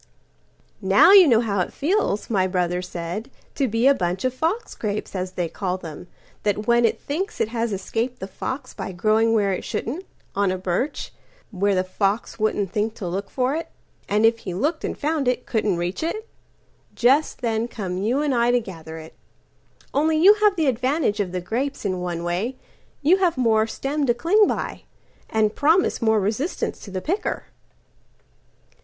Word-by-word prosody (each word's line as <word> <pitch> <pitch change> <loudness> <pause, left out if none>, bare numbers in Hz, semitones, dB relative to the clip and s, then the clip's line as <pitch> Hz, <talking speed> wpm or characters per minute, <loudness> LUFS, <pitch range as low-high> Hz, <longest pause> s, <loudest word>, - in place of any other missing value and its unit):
"Now - - +6
you 390 -4 +9
know 235 -4 +5
how 205 -4 -1
it 180 - -1
feels," 320 - 0
my 190 -4 +1
brother 180 -1 0
said,"To 185 - -5
be 225 +2 0
a 275 - +7
bunch 180 -3 -2
of 255 - +1
fox 330 - -2
grapes, 210 -1 -4
as 185 0 -3
they 175 -2 -1
call 185 +2 -3
them, 170 -1 -9 0.3
That 210 0 -1
when 235 +1 +4
it - - +1
thinks 375 +9 -4
it 215 - +1
has 230 -1 -1
escaped 225 +6 -2
the 190 - -5
foxBy 200 -4 -6
growing 220 +4 +3
where 200 -3 +2
it - - -4
shouldn't—on 230 - -3
a 185 - -1
birch, 185 - -2 0.4
Where 200 -1 +1
a 185 - +2
fox 195 +5 -1
wouldn't 210 -3 0
think 215 +2 -1
to 195 - -5
look 195 +3 -3
for 255 +1 0
it—And 225 -8 -3
if 230 0 +4
he 185 -5 -5
looked 305 - -1
and - - -3
found 300 -2 -1
it, 250 0 0
couldn't 215 -5 0
reach 175 +2 -3
it—Just 315 - -2
then 230 -1 0
come 190 -6 -4
you 240 +9 +1
and 290 -3 +1
I 235 -1 +3
to 245 0 +4
gather 165 -7 -9
it. 160 0 -10 0.8
Only 310 +2 +2
you 375 +6 +8
have 420 -2 +5
the 325 -4 +1
advantage 260 -2 +1
of 195 -3 -1
the 180 0 -3
grapesIn 220 -4 -2
one 175 -1 -3
way: 185 +9 -2 0.5
you 340 +7 +5
have 360 -6 +1
one 255 - +1
more 220 -1 +3
stem 280 +4 -2
to 240 - +3
cling 395 - +4
by, - - -3 0.5
And 215 -1 +1
promise 320 +3 +3
more 220 -1 +3
resistance 220 - -2
to - - -10
the 185 -1 -4
picker." 385 - -2
225 Hz, 175 wpm, -23 LUFS, 190-275 Hz, 0.8 s, you